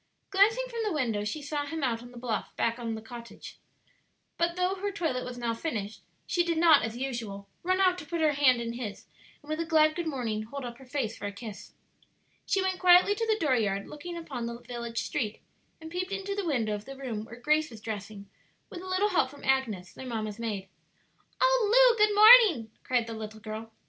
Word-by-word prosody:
Glancing 435 +6 +4
from 470 -2 -6
the 425 - -1
window, 230 -8 0
she 285 +8 -4
saw 290 0 -2
him 320 0 -4
out 230 -3 0
on 245 - -11
the 245 - -13
bluff 235 -2 -3
back 230 +1 0
of 230 -2 -3
the 220 - -8
cottage; 235 +1 -10 0.8
but 340 0 0
though 365 +1 +1
her 400 +1 -3
toilet 320 -10 -2
was 250 0 -7
now 235 -1 -1
finished, 220 -5 -4 0.2
she 350 - +1
did 340 -1 -1
not, 320 -3 +6
as 225 +1 -4
usual, 230 -7 -5
run 370 +2 +1
out 365 -1 +3
to 300 - -9
put 340 - -3
her 310 -1 +4
hand 275 -4 +4
in 230 0 -3
his, 235 -4 -6 0.4
and 290 - -16
with 310 - -2
a - - +1
glad 310 -2 +4
good 345 -2 -3
morning 235 -7 -2
hold 255 +5 -7
up 240 0 -8
her 265 - -14
face 250 -5 -2
for - - -5
a - - -4
kiss. 210 0 -9 0.7
She 390 - +2
went 375 -1 -1
quietly 360 +2 +6
to 455 +2 -2
the 435 -1 +2
dooryard 220 - +1
looking 340 +4 -7
upon 270 -8 -5
the 235 0 -7
village 235 -1 -4
street, 215 -3 -3 0.4
and 320 0 -10
peeped 365 +2 -3
into 395 0 -3
the 400 -3 -3
window 230 -8 0
of 210 0 -5
the 270 0 -9
room 240 -6 -4
where 225 - -10
Grace 305 +5 +1
was 225 -3 -11
dressing 210 -2 -7 0.4
with 350 - -7
a 375 - -9
little 370 +3 +1
help 360 -9 +2
from 285 +1 -14
Agnes, 225 -10 0
their 260 - -9
mamma's 215 -2 -4
maid. 210 -4 -3 0.7
"Oh, - - +3
Lu, - - +6
good 420 -1 +3
morning," 420 - +8
cried 245 -2 0
the 230 - -6
little 215 0 -7
girl. 220 +1 -7
265 Hz, 220 wpm, -29 LUFS, 225-350 Hz, 0.8 s, morning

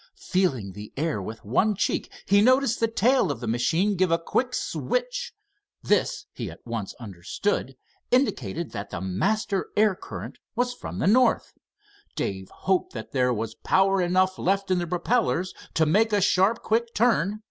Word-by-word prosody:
"Feeling" 145 - 0
the 105 +3 -9
air 150 -7 -1
with 110 +3 -8
one 195 - +2
cheek, - - -1
he 200 +1 +5
noticed 255 +1 +3
the 230 - +3
tail 230 -1 +2
of 140 - -5
the 120 - -5
machine 160 - +1
give 185 -1 +2
a 165 - +3
quick 250 +9 -1
switch. - - -2 0.5
This 430 -4 +1
he - - -5
at - - -13
once 115 -4 -4
understood 120 - -3 0.3
indicated 170 - 0
that 100 0 -6
the 90 - -5
master 195 - -1
air 210 -1 +5
current - - -8 0.2
was 245 +1 0
from - - -7
the - - -1
north. 245 +6 +3 0.6
Dave 95 -1 -3
hoped 185 -9 -1
there 125 -2 +2
was 115 -1 -3
power 190 +7 +2
enough 185 +1 +2
left 195 +1 0
in 185 - +3
the 175 - -2
propellers 180 +1 0 0.2
to 160 - +4
make 215 +8 +3
a 205 - +3
sharp, 195 +3 +2
quick 230 +1 0
turn. 215 -3 +2
190 Hz, 165 wpm, -25 LUFS, -, 0.6 s, he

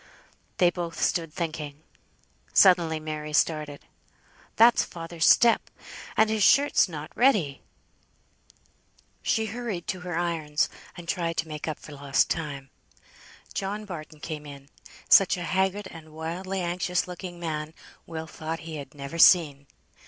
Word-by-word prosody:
They 175 -1 +4
both 170 -2 -5
stood 165 -3 0
thinking. 155 -3 -5 0.7
Suddenly 170 -4 +5
Mary 155 -1 -5
started. 150 -2 0 0.7
"That's 230 +1 +6
father's 165 0 -1
step. 235 -1 +5 0.5
And 220 - +5
his 215 0 -1
shirt's 280 -1 +5
not 155 -2 -8
ready!" 210 - +2 1.6
She 220 -1 +1
hurried 220 -5 -4
to 185 - -2
her 175 -2 -4
irons, 160 -4 0 0.3
and 170 -1 -10
tried 170 -1 -2
to 160 - -1
make 150 0 -6
up 155 - -3
for - - -13
lost 140 -1 +1
time. 140 -5 -4 0.8
John 205 +2 -3
Barton 155 -5 -9
came 150 -2 -6
in. 140 -1 -11 0.4
Such 195 -1 +6
a 175 - -4
haggard 190 +3 0
and 160 -1 -12
wildly 180 +4 -4
anxious 180 +1 -1
looking 180 -1 -8
man, 155 -2 -4 0.3
Will 160 -1 -5
thought 160 +1 -6
he 160 -1 -7
had 145 +1 -9
never 140 +3 -7
seen. 145 -6 +5
165 Hz, 135 wpm, -26 LUFS, 155-185 Hz, 1.6 s, That's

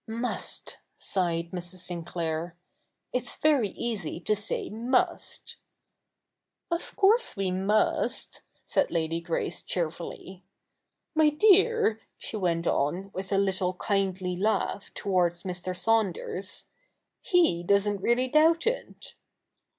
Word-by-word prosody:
' - - -51 0.2
Must! - - -5
' - - -49
sighed 170 -3 -1
Mrs. 180 0 -4
Sinclair. 170 -1 -3 0.3
' - - -51
It"s 250 -1 -1
very 285 -9 +3
easy 195 -8 -4
to 215 - +1
say 205 +1 -3
?ni(st.' 240 +4 -1 1.1
'Of 340 0 -3
course 430 - +4
we 195 -2 0
must,' 195 +4 +1 0.2
said - - +1
Eady 165 0 -1
Grace 170 0 -2
cheerfully. 175 +2 -4 0.4
' - - -56
My 310 -1 +5
dear,' 390 - +4 0.2
she - - -5
went 175 -4 0
on, 175 +9 0
with 190 +1 -5
a 195 - +3
little 190 -2 +1
kindly 190 -2 -1
laugh, 205 +1 -1
towards 175 -3 +1
Mr. 180 -1 -4
Saunders, 200 -2 -1 0.3
' - - -54
he 335 - +4
doesn't 200 +2 +2
really 245 +4 +2
doubt 320 +5 +4
it.' 480 +2 -3
195 Hz, 125 wpm, -28 LUFS, 175-235 Hz, 1.1 s, My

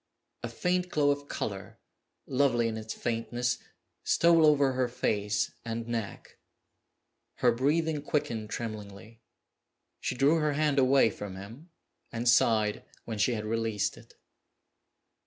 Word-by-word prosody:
A - - -4
faint 180 0 -1
glow 145 -3 +3
of 145 0 -3
color, 100 -7 -5 0.5
lovely 125 -3 +2
in 110 - -3
its 110 0 -6
faintness, 120 +1 -2 0.4
stole 165 -2 +5
over 140 -3 +4
her 130 -1 +1
face 110 -4 -1
and 115 0 -4
neck. 115 -4 -5 1.0
Her - - +3
breathing 150 +5 +1
quickened 140 -8 -2
tremblingly. 110 0 -7 0.8
She - - -2
drew 140 +5 +4
her 150 -2 +1
hand 145 -1 +2
away 130 -3 +4
from 100 -2 -7
him, 115 - -11 0.4
and 115 +1 -3
sighed 110 -3 +3 0.2
when 110 -2 -5
she 115 +4 +2
had 105 -1 -4
released 110 -2 -1
it. - - -17
120 Hz, 130 wpm, -29 LUFS, 110-145 Hz, 1.0 s, stole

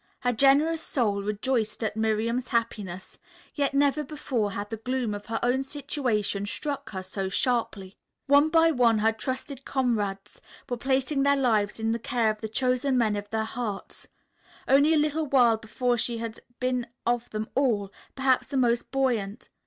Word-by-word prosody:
Her 245 0 +1
generous 285 +6 +4
soul 210 -10 0
rejoiced 215 +2 -1
at 215 - -1
Miriam's 220 +3 0
happiness, 210 -6 -3 0.3
yet 280 -1 0
never 285 +1 +3
before 260 -8 -2
had 205 +2 -5
the 225 - -3
gloom 250 -1 -2
of 205 0 -7
her 225 0 -2
own 250 +2 +2
situation 255 -8 -2
struck 280 +7 -4
her 190 -2 -5
so 190 0 -4
sharply. 210 -4 -1 0.3
One 285 +2 +5
by 325 0 +5
one 240 -5 +3
her 220 +1 +3
trusted 260 +4 -5
comrades 215 -8 -2 0.3
were 245 - -2
placing 270 +3 0
their 280 +1 +4
lives 220 -6 +1
in 225 0 0
the 230 - -1
care 230 -1 +1
of 215 - -9
the 220 - -4
chosen 255 +3 +1
men 220 -4 +2
of 205 0 -5
their 220 0 -1
hearts. 220 -2 -5 0.6
Only 285 +4 +5
a - - +4
little 300 +1 +1
while 245 -5 +4
before 240 +2 -1
she 235 +1 -1
had 230 -1 -5 0.2
been 250 -1 -1 0.2
of 240 0 0
them 215 0 -4
all 225 -8 +1 0.2
perhaps 265 -1 +2
the 275 - -3
most 240 -2 +1
buoyant. 245 -6 -1
240 Hz, 170 wpm, -27 LUFS, 215-270 Hz, 0.6 s, One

